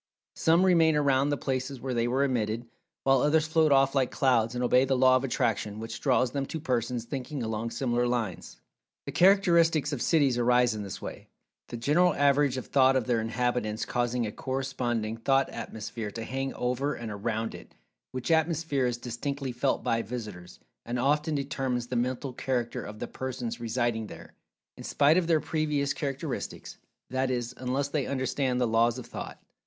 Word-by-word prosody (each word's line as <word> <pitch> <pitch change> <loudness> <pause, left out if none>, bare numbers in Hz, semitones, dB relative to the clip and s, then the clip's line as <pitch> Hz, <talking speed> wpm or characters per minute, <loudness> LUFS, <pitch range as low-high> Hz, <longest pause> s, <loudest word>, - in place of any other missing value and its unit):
Some 165 +3 +3
remain 165 -4 +4
around 140 -1 +2
the 145 - 0
places 130 0 -3
where 130 +1 -3
they 120 0 +1
were 130 +3 +1
emitted, 115 -3 -1 0.4
while 135 -1 +4
others 155 +1 +3
float 160 -1 +3
off 135 0 +4
like 135 -3 +2
clouds, 120 -3 +2
and 125 - -1
obey 125 +1 +4
the 135 -1 +1
Law 130 0 +6
of 130 - +1
Attraction 110 -5 -1
which 115 +1 -6
draws 130 -3 +2
them 140 0 -2
to 160 - -4
persons 125 -4 -1
thinking 135 +1 -4
along 110 +1 -2
similar 120 -1 0
lines. 110 - -3 0.5
The - - -4
characteristics 170 -6 +4
of 130 - -3
cities 140 -7 +3
arise 125 0 +3
in 105 - -5
this 100 -2 -7
way, - - -8 0.4
the 120 - -6
general 150 +10 +3
average 140 -1 +3
of 130 - -4
Thought 135 -1 +4
of 130 -4 +1
their 120 -3 +1
inhabitants 115 -1 -1
causing 120 0 -1
a 105 - -4
corresponding 125 -5 -2
Thought 135 +4 +2
atmosphere 110 0 -6
to 115 +2 -6
hang 135 +3 -3
over 125 +4 -1
and 115 -2 -6
around 110 +2 -3
it, - - -12 0.4
which 130 +5 -3
atmosphere 160 -4 +1
is 120 -1 -2
distinctly 130 +3 -4
felt 125 +3 0
by 115 -2 +1
visitors, 105 -6 -7 0.2
and 120 +1 -3
often 150 +4 +1
determines 135 -3 -2
the 125 - -5
mental 125 +2 -1
character 125 -2 -2
of 105 0 -8
the - - -5
persons 125 -3 -5
residing 115 -1 -1
there, - - -12 0.4
in - - -9
spite 145 +3 +3
of 180 -2 +1
their 165 -2 +4
previous 150 -3 -1
characteristics—that 135 -2 -5
is, 120 -1 -2
unless 130 +3 -1
they 140 -2 -1
understand 130 -1 -1
the 125 - +2
Laws 115 +2 +2
of 125 - -7
Thought. - - -7
130 Hz, 180 wpm, -28 LUFS, 120-140 Hz, 0.5 s, Law